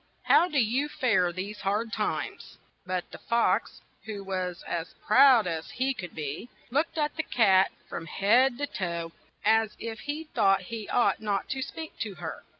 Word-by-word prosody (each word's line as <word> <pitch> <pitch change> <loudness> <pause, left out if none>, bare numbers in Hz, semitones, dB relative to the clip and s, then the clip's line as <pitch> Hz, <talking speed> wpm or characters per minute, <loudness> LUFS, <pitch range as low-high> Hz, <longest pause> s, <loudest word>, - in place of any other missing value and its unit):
How 350 - +5
do 305 - -2
you 260 +5 +2
fare 195 -11 +2
these 195 +4 -6
hard 210 +4 -1
times? - - -3
' - - -39
' - - -42
But 185 -1 -3
the - - -9
fox, 235 0 +1 0.2
who 210 -2 -6
was 185 -2 -3
as 170 0 -4
proud 245 0 +7
as 165 -2 -3
he 265 +2 -1
could 180 -8 -8
be, 150 - -5 0.2
looked 305 +5 0
at 300 -1 0
the - - +2
cat 195 -10 +4 0.2
from 165 - -6
head 240 - +3
to 290 - -1
foot, 170 -8 -4 0.3
as 220 0 +3
if 225 -1 -6
he 295 +2 -4
thought 195 -11 +2
he 220 -2 -5
ought 245 - +2
not 205 -3 -1
to 265 - -2
speak 315 +4 -7
to 210 -4 -4
her. 170 -2 -7
215 Hz, 185 wpm, -28 LUFS, 185-260 Hz, 0.3 s, proud